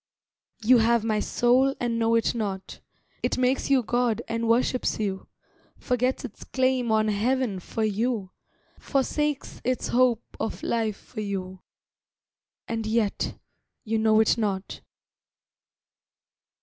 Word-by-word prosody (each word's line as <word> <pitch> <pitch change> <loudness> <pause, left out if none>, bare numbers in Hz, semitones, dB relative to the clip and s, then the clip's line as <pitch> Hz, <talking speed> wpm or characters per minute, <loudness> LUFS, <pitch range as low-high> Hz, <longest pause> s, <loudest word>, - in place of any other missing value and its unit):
You 245 +2 +6
have 230 0 +3
my 215 -1 +1
soul 255 +5 +2
and 235 -1 -1
know 230 0 +3
it 230 - +2
not, 200 -5 -4 0.4
It - - 0
makes 255 +2 +1
you 270 -3 +4
God 240 -1 0
and 230 0 -2
worships 245 +1 +1
you, 195 -3 -3 0.5
Forgets 250 +1 0
its 215 - -9
claim 255 -2 +1
on 215 0 +3
Heaven 220 0 0
for 220 +5 -4
you, 215 -2 -1 0.5
Forsakes 295 +1 -1
its 255 -1 -1
hope 245 -2 +3 0.2
of - - -4
life 220 -3 0
for 215 - -8
you, 190 -2 -4 1.1
And 225 -1 -3
yet—you 220 0 -3
know 220 0 +4
it 220 - +2
not. 200 -3 -2
230 Hz, 125 wpm, -26 LUFS, 215-250 Hz, 1.1 s, You